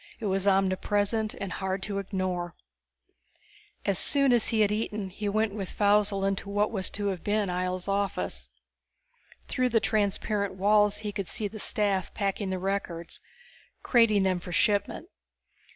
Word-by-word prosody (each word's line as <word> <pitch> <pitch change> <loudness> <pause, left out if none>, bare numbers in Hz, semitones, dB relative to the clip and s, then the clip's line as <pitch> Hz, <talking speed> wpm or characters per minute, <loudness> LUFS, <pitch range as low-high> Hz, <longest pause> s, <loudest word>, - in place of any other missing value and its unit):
It 225 - -5
was 195 0 0
omnipresent 205 +3 +1
and 195 -2 -5
hard 190 0 -3
to 200 -2 -2
ignore. 185 -3 -3 1.3
As 200 -2 +2
soon 275 -3 +3
as 235 - +3
he 225 -2 +2
had 205 -1 +3
eaten 210 -2 -2
he 205 +2 -3
went 215 0 +1
with 195 -3 -4
Faussel 205 -1 +2
into 195 0 -2
what 205 +1 +1
was 190 -4 -1
to 205 -1 0
have 185 -4 -4
been 205 -1 +1
Ihjel's 180 0 -2
office. 130 - -2 1.0
Through 255 0 +1
the 230 -1 +3
transparent 200 -1 0
walls 210 +1 +4
he 210 -1 -4
could 200 -3 -4
see 210 - -2
the 215 +1 -9
staff 200 -4 0
packing 200 -1 -1
the 190 - -1
records, 185 -3 -3 0.6
crating 230 -5 +4
them 185 -1 +1
for 180 - -8
shipment. 205 - +1
200 Hz, 155 wpm, -28 LUFS, 190-210 Hz, 1.3 s, walls